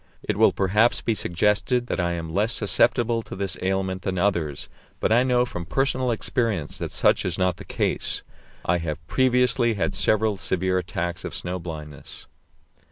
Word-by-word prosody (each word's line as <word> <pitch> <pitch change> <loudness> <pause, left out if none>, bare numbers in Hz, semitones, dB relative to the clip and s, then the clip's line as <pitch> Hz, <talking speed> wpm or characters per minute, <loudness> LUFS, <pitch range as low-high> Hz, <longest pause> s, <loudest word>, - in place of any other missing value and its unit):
It - - -1
will - - +5
perhaps 105 +5 +2
be 115 - 0
suggested 105 +6 +1
that - - -3
I 85 -1 0
am 80 -1 -5
less 105 +5 +2
susceptible 115 +3 +2
to - - -9
this 95 -2 -1
ailment 95 0 -1
than 95 -1 -3
others, 85 -7 -1 0.3
but - - 0
I 120 +2 +5
know 125 -1 +2
from 85 -7 -6
personal 130 +6 0
experience 115 - -1
that - - -4
such - - +3
is 90 -2 -2
not 90 -1 +1
the 100 - -10
case. - - -1 0.4
I 90 0 +2
have 80 -2 -5
previously 125 - +3
had 95 0 -1
several 105 +2 +1
severe 95 0 0
attacks 85 -1 -4
of - - -6
snow 90 +1 -3
blindness. 75 -4 -9
95 Hz, 170 wpm, -24 LUFS, 85-115 Hz, 0.4 s, will